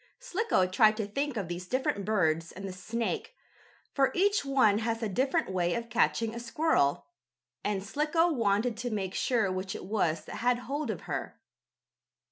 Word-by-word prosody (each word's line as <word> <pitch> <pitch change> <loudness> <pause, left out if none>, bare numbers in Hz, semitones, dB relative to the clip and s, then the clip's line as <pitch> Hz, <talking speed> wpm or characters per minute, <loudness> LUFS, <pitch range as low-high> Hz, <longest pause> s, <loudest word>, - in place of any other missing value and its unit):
Slicko 450 - +1
tried 215 +4 +4
to 220 - -1
think 275 +5 -2
of 195 -5 -2
these 175 +1 -5
different 250 -5 -1
birds 165 -6 +1
and 195 +1 -7
the 190 - -6
snake, 230 - -3 0.6
for 270 -2 +3
each 405 +1 +3
one 260 -7 +3
has 230 0 -2
a - - +1
different 255 +1 0
way 175 -2 +1
of 235 0 -5
catching 225 -1 +2
a 235 - -5
squirrel, 240 - +1 0.6
and 200 -2 -1
Slicko 305 - +1
wanted 225 -2 +1
to 245 +2 -3
make 195 -4 -3
sure 225 -5 +1
which 185 +1 -3
it - - -7
was 175 -6 0
that - - -7
had 245 +1 +2
hold 275 +5 -4
of - - -3
her. - - -5
225 Hz, 175 wpm, -30 LUFS, 190-270 Hz, 0.6 s, tried